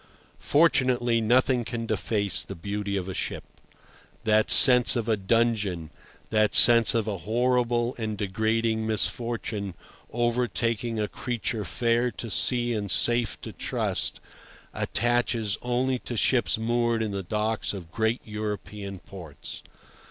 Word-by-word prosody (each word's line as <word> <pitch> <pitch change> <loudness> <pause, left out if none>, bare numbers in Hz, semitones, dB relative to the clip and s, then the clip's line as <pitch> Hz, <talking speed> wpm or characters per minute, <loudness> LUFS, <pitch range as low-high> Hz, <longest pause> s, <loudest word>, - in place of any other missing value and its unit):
Fortunately, 125 -6 +2
nothing 125 +2 +2
can 115 0 -5
deface 100 -4 -1
the 100 - -8
beauty 100 +3 -4
of 95 -1 -4
a 95 - -5
ship. - - -4 0.8
That 110 0 +2
sense 125 -2 +7
of 120 -2 -2
a 110 - +2
dungeon, 105 -5 -1 0.4
that 110 -1 +1
sense 115 -1 +7
of 110 -2 0
a 100 -3 -3
horrible 120 +4 0
and 110 -2 -4
degrading 110 +2 -1
misfortune 110 -3 -1 0.4
overtaking 120 -1 -1
a 105 - -1
creature 115 -1 -4
fair 115 +6 0
to 115 - -7
see 120 +1 +1
and 105 -2 -4
safe 120 +4 +3
to - - -8
trust, - - -1 0.5
attaches 120 -3 0
only 125 +1 -1
to 120 - -6
ships 120 +1 +1
moored 115 0 0
in 110 - -3
the 100 -1 -4
docks 105 +4 -2
of 90 -5 -9
great 110 +3 -1
European 105 -2 -6
ports. 85 -6 -11
115 Hz, 130 wpm, -25 LUFS, 105-120 Hz, 0.8 s, sense